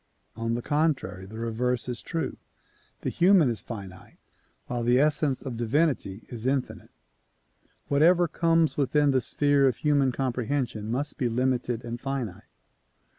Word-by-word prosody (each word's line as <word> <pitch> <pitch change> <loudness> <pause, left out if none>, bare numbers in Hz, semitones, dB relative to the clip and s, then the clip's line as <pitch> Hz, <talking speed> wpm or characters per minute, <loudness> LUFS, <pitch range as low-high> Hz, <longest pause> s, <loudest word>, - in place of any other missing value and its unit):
On 115 +1 -2
the 120 - -4
contrary 145 - -1
the 110 +3 -10
reverse 120 +2 -1
is 125 -1 -4
true; 165 -2 -3 0.7
the - - -2
human 175 -7 +5
is 110 -5 -4
finite 95 -5 -9 0.5
while 120 -1 -3
the 120 +1 +3
essence 150 -2 +1
of 125 -4 -5
divinity 120 - 0
is 120 0 -5
infinite. 135 -1 -2 1.0
Whatever 170 +5 +4
comes 165 0 +2
within 145 +1 +3
the 130 -1 +2
sphere 145 +2 +3
of 130 - 0
human 145 -3 +2
comprehension 125 -3 -2
must 140 +7 -3
be 125 -4 +1
limited 125 -1 -1
and 120 +1 -5
finite. 135 -9 -4
130 Hz, 140 wpm, -27 LUFS, 115-145 Hz, 1.0 s, human